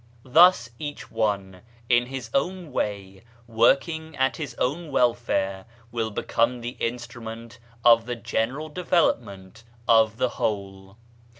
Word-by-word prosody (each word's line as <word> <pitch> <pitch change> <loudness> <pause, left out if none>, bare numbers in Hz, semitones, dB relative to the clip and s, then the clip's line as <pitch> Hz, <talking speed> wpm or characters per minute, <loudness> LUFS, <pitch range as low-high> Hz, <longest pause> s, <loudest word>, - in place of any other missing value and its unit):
Thus 150 -3 +5
each 145 -1 -7
one, 100 -4 -2 0.3
in 120 0 +3
his 130 -3 -6
own 175 +3 -1
way, 100 -5 -3 0.2
working 140 +7 +1
at 130 -3 +1
his - - -6
own 150 +5 -2
welfare, 115 -7 0 0.2
will 115 -1 -2
become 115 +3 0
the 120 +2 -5
instrument 115 0 -6 0.3
of 115 -1 +6
the 120 - -2
general 125 +6 -2
development 115 - -1 0.2
of 110 -1 +4
the 130 0 +1
whole. 95 -1 -3
120 Hz, 120 wpm, -25 LUFS, 110-135 Hz, 0.3 s, of